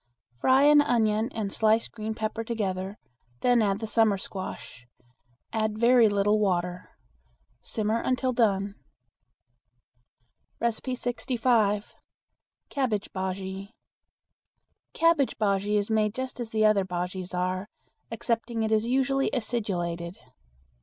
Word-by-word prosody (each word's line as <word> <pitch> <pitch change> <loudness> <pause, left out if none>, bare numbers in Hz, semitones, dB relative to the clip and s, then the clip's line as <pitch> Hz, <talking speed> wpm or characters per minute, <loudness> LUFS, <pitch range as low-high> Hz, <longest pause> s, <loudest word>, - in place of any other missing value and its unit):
Fry 260 - +3
an 295 0 +7
onion 220 -4 +1
and 210 -3 -3
sliced 220 +1 +2
green 220 -1 -5
pepper 220 +1 -3
together; 200 -3 -3 0.4
then 245 -1 +4
add 200 -2 +1
the 220 - -5
summer 220 -2 +3
squash. 185 -10 -7 0.7
Add 215 -1 -1
very 235 0 +5
little 205 +1 +2
water. 180 -3 -1 0.7
Simmer 220 +1 -1
until 255 0 0
done. 200 -4 +1 1.9
65. 235 -2 0 0.8
Cabbage 240 -8 -1
Bujea. 190 +1 -4 1.3
Cabbage 330 -5 +3
bujea 205 0 +1
is 205 +2 -1
made 215 -1 +1
just 260 -1 -5
as 235 -2 -5
other 215 -2 +4
bujeas 180 0 -4
are, 185 +2 -1 0.4
excepting 230 0 -2
it 220 - -1
is 220 +1 +2
usually 270 +2 +1
acidulated. 185 -7 -2
215 Hz, 105 wpm, -27 LUFS, 195-235 Hz, 1.9 s, an